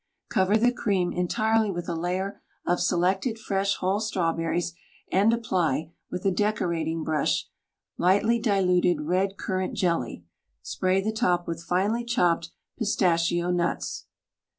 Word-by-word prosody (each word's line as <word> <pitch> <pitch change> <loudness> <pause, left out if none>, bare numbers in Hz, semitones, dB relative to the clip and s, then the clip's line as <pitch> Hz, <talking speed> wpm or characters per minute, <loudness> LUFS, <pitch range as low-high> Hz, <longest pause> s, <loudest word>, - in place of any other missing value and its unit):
Cover 190 +3 +3
the 245 +2 +3
cream 195 -7 0
entirely 215 +5 +1
with 175 -2 -4
a 175 - -2
layer 180 +4 -3 0.2
of 175 0 +1
selected 190 +6 +1
fresh 200 -2 0
whole 190 +2 0
strawberries, 170 -4 -1 0.4
and 200 +4 +4
apply, 170 - 0 0.2
with 180 +1 -5
a 195 - +4
decorating 170 -5 -1
brush, 155 -1 0 0.5
lightly 205 +6 +3
diluted 180 -6 +2
red 185 +5 0
currant 185 0 -2
jelly; 165 - -1 0.4
spray 185 +1 0
the 215 +2 -2
top 175 -5 +1
with 165 -1 -4
finely 195 +7 0
chopped 175 -9 +1 0.3
pistachio 175 -5 +1
nuts. 175 -1 -2
185 Hz, 130 wpm, -26 LUFS, 170-205 Hz, 0.5 s, and